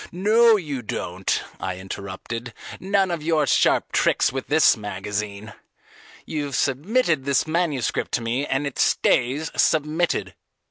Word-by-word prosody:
"No 220 +5 +4
you 145 -8 -4
don't," 95 -4 -3 0.2
I 95 -1 -4
interrupted; 100 +5 -7 0.2
"none 195 -1 +1
of 170 -3 -3
your 155 -1 +1
sharp - - +2
tricks - - +2
with 135 -1 -4
this 155 +2 +5
magazine. 105 +1 -5 0.7
You've 145 -3 -3
submitted 155 - +1
this 140 -1 +1
manuscript 155 -5 -1
to 125 - +1
me, 120 +4 -1
and 135 0 -1
it 140 - -5
stays 135 +6 +1
submitted. 160 +3 +1
140 Hz, 130 wpm, -23 LUFS, 115-165 Hz, 0.7 s, this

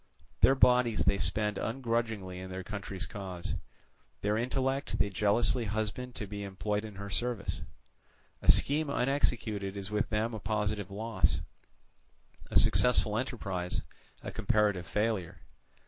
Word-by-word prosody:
Their 135 - +6
bodies 125 -3 +4
they 100 - +3
spend 105 +4 +1
ungrudgingly 115 -6 -2
in 95 0 -7
their 95 0 -5
country's 100 -2 -5
cause; 95 -3 -5 0.7
their 105 +1 +1
intellect 135 +4 0
they 100 - +1
jealously 105 +5 +2
husband 110 +4 -3
to 105 - -4
be 100 0 -6
employed 105 +2 -2
in 105 -2 -8
her 100 0 -7
service. 120 -1 -1 0.8
A - - +8
scheme 150 +1 +2
unexecuted 115 -7 0
is 100 +1 -5
with 105 0 0
them 110 +2 0
a 110 - -4
positive 105 -1 -1
loss, 105 0 0 1.1
a - - +3
successful 120 -4 +4
enterprise 100 -7 -2 0.4
a - - -5
comparative 105 -5 +1
failure. 105 -4 -1
105 Hz, 130 wpm, -31 LUFS, 100-120 Hz, 1.1 s, A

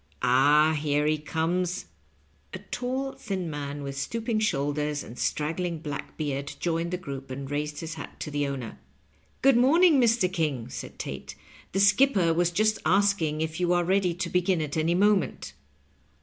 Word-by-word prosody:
Ah, 145 +5 +5
here 150 -1 0
he 155 0 +1
comes." 170 +4 -1 0.7
A - - -6
tall, 260 +2 -2
thin 185 -8 -4
man 145 0 -5
with 140 0 -5
stooping 225 - -2
shoulders 150 -5 -1
and 115 - -10
strag 155 +6 -2
gling 170 -3 -3
black 145 -1 -6
beard 140 -2 -3
joined 170 0 -1
the 180 - -2
group, 140 -6 -7
and 135 +1 -6
raised 150 +1 -3
his 160 -1 -5
hat 155 - -9
to 150 - -4
the 145 -1 0
owner. 130 -5 -6 0.3
" 75 - -37
Good 270 -2 +6
morning, 300 +4 +5
Mr. 230 -4 +3
King," 145 -9 -1
said 130 - -8
Tate; - - -6 0.2
" - - -23
the 195 - +1
skipper 195 -3 +4
was 175 +1 +2
just 215 +5 +1
asking 175 -3 +2
if 160 +1 -3
you 180 0 +2
are 175 0 +2
ready 185 -1 +1
to 175 0 -3
begin 180 0 +1
at 150 -2 -3
any 165 +2 +1
mo 205 +3 +5
ment." 165 - -5
165 Hz, 180 wpm, -27 LUFS, 145-195 Hz, 0.7 s, Good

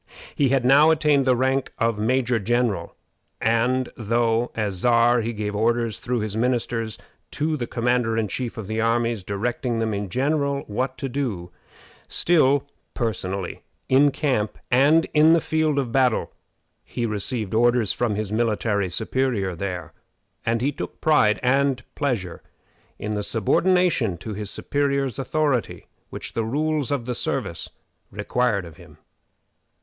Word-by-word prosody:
He 140 -3 +2
had 130 -1 +1
now 145 +4 +6
attained 150 -4 +3
the 130 - +5
rank 130 +2 0
of 115 -3 0
major 125 +1 +1
general; 110 -5 -1 0.4
and 120 +3 +1
though, 115 +1 +1
as 105 -3 -1
Czar, 120 +3 +3
he 115 +1 -2
gave 105 -2 -4
orders 115 -1 0
through 120 -2 -2
his 105 -1 -4
ministers 115 -2 -1 0.3
to 155 +1 -1
the 120 -5 -4
commander 120 -1 0
in 110 -2 0
chief 120 +3 -4
of 110 - -5
the 110 +2 -2
armies 115 -2 0
directing 115 +5 -2
them 110 -1 -1
in 100 -1 -3
general 140 - 0
what 130 +5 -3
to 135 - -3
do, 120 -10 -3 0.6
still 145 -5 +3 0.3
personally, 95 -5 -3 0.3
in 140 +2 +5
camp 130 -7 -1
and 145 +6 +5
in 155 +2 +6
the 170 - +5
field 155 -2 0
of 130 -4 -1
battle, 125 -3 +2 0.5
he 120 - -4
received 110 0 -2
orders 120 -1 +3
from 120 -4 -1
his 105 -1 -3
military 105 -3 0
superior 110 -1 -1
there; 90 -2 -5 0.5
and 115 +1 0
he 140 - +2
took - - -6
a - - -36
pride 130 -9 +3
and 135 0 +2
pleasure 115 -12 -2 0.6
in 105 +1 -4
the 105 - -1
subordination 130 - +2
to 110 +5 -7
his 105 0 -4
superior's 140 -1 -1
authority 140 -2 -1 0.2
which - - -7
the 115 - -1
rules 150 +4 -1
of 140 -5 -1
the 125 - -2
service - - -3 0.4
required 105 -1 0
of 85 -3 -12
him. - - -16
120 Hz, 150 wpm, -23 LUFS, 110-135 Hz, 0.6 s, now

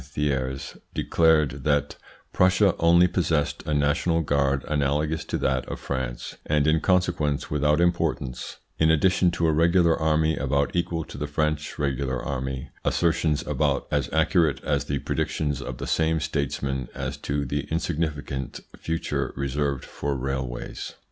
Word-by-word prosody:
Thiers 65 -1 -2 0.2
declared 75 -5 +2
that 75 0 +1 0.4
Prussia 95 +1 +4
only 85 +2 +6
possessed 80 -5 0
a 75 - 0
national 75 +4 +2
guard 70 -2 +1
analogous 75 +2 0
to - - -2
that 65 -1 0
of - - -5
France, 65 -3 -4
and 75 -1 +2
in 80 +1 +3
consequence 85 -5 +1
without 75 +1 +2
importance, 85 -7 -1 0.2
in 80 - +4
addition 90 +3 +4
to 85 0 -1
a 80 - +4
regular 85 +1 +4
army 80 0 +2
about 70 +2 0
equal 85 -1 0
to 70 - -10
the 75 - -2
French 75 +1 -1
regular 70 -2 -1
army; 65 0 -4
assertions 80 -3 +1
about 75 -1 0
as 75 -3 0
accurate 80 -2 +2
as - - 0
the 70 - -1
predictions 70 0 -2
of 65 -2 -6
the - - -5
same 80 0 +1
statesman 70 -3 -2
as - - -3
to 70 0 -2
the 70 +2 -2
insignificant 75 -5 -3 0.2
future 75 -5 -2
reserved 70 0 -1
for 70 -1 -3
railways. 65 -2 -4
75 Hz, 145 wpm, -25 LUFS, 70-80 Hz, 0.4 s, only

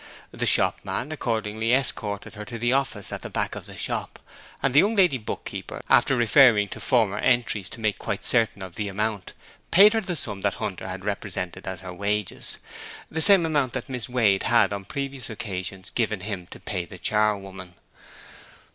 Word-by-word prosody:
The - - -2
shopman 145 - +1
accordingly 115 -4 -1
escorted 105 -6 0
her 105 -1 -7
to 115 +2 -6
the 120 +2 +1
office 135 -7 -1
at - - -5
the - - -6
back - - -2
of - - -8
the - - -10
shop, - - -2 0.5
and 135 - +2
the 145 - +7
young 210 +6 +3
lady 180 -10 +4
book 110 - -6
keeper - - -6
after 135 - +5
referring 115 -3 +5
to - - -7
former 110 -6 +1
entries 120 -6 +1
to - - -10
make 110 -2 -1
quite - - -4
certain 115 -4 +2
of 95 -2 -8
the 105 +3 -3
amount, 105 -1 -3 0.4
paid 205 +4 +7
her 225 - +1
the 180 -5 -3
sum 105 -9 -4
that 100 - 0
Hunter 95 -1 -4
had 95 +1 -6
represented 95 -3 -4
as 95 -1 -5
her 90 -1 -7
wages, 100 +1 -2 0.5
the 160 - -1
same 195 -2 +7
amount 145 -6 0
that 130 -1 -5
Miss 125 -2 +1
Wade 110 -6 +3
had 110 -4 +4
on 100 - -4
the 95 - -20
previous 140 -3 -4
occasions 95 -3 -5
given 110 -5 -1
him 95 -3 -5
to - - -11
pay 95 -3 -3
the 95 - -11
charwoman. 95 -3 -1
110 Hz, 190 wpm, -25 LUFS, 100-130 Hz, 0.5 s, the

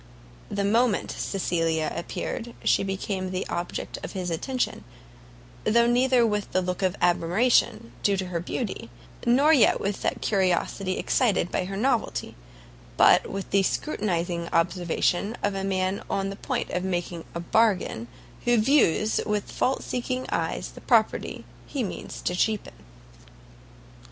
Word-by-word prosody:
The 200 0 -1
moment 225 +1 +2
Cecilia 165 -4 -1
appeared, 230 +7 -4
she - - +3
became 195 -1 -3
the 185 0 -3
object 175 +1 -4
of - - -6
his 180 -3 -3
attention, 255 - -2 0.8
though 235 +2 +4
neither 245 0 +4
with 210 -2 -1
the 185 - +3
look 180 +1 -3
of 185 0 +1
admiration 175 - +2
due 200 -1 +2
to 190 - -2
her 170 -2 -2
beauty, 225 +5 -4 0.4
nor 280 +6 +5
yet 270 - +5
with 200 0 -2
that - - 0
of - - -14
curiosity 185 -1 0
excited 215 -9 +1
by 185 - 0
her 195 +1 -5
novelty, 245 +1 0 0.6
but - - +5
with 195 0 -5
the 200 - +4
scrutinizing 175 - -1
observation 175 +4 +1
of 205 - +1
a 195 0 -3
man 190 0 0
on 195 0 -1
the - - -6
point - - -3
of 180 - -1
making 175 -2 -3
a - - -2
bargain, 180 - +1 0.4
who 240 0 +4
views 215 - +3
with 210 -1 -2
fault 265 - 0
seeking 255 +1 -3
eyes - - -1
the - - -12
property - - +1 0.2
he 275 -4 -2
means 195 - -6
to 180 - 0
cheapen. 215 +3 0
195 Hz, 145 wpm, -26 LUFS, 180-230 Hz, 0.8 s, nor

